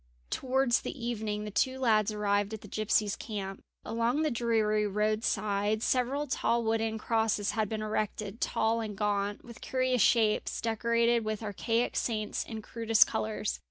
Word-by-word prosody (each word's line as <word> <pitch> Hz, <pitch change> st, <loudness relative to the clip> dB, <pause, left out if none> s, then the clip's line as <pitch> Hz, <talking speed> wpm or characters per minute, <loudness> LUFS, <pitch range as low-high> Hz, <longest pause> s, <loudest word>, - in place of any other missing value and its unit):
Towards 260 Hz, -1 st, +1 dB
the -, -, -6 dB
evening 215 Hz, -3 st, -3 dB
the 210 Hz, -, -5 dB
two 260 Hz, +5 st, +1 dB
lads 220 Hz, -5 st, +3 dB
arrived 205 Hz, 0 st, 0 dB
at 215 Hz, -, -11 dB
the -, -, -11 dB
gypsies' 215 Hz, 0 st, +1 dB
camp. 195 Hz, -3 st, -6 dB, 0.2 s
Along 235 Hz, +6 st, 0 dB
the 310 Hz, -, +1 dB
dreary 220 Hz, -3 st, +1 dB
roadside 210 Hz, 0 st, 0 dB
several 260 Hz, +4 st, +1 dB
tall 235 Hz, -3 st, 0 dB
wooden 225 Hz, 0 st, 0 dB
crosses 220 Hz, -2 st, 0 dB
had 215 Hz, -2 st, -1 dB
been 215 Hz, -1 st, -3 dB
erected, 215 Hz, 0 st, -3 dB
tall 225 Hz, +1 st, +1 dB
and 210 Hz, -3 st, -5 dB
gaunt, 205 Hz, 0 st, -1 dB
with 235 Hz, -1 st, -12 dB
curious 255 Hz, -2 st, +1 dB
shapes, 220 Hz, 0 st, +3 dB
decorated 235 Hz, +1 st, +1 dB
with 215 Hz, 0 st, -3 dB
archaic 225 Hz, +3 st, -1 dB
saints 215 Hz, -3 st, -1 dB
in 220 Hz, -2 st, -7 dB
crudest 225 Hz, -1 st, +4 dB
colours. 215 Hz, -1 st, -2 dB
220 Hz, 155 wpm, -30 LUFS, 210-235 Hz, 0.2 s, crudest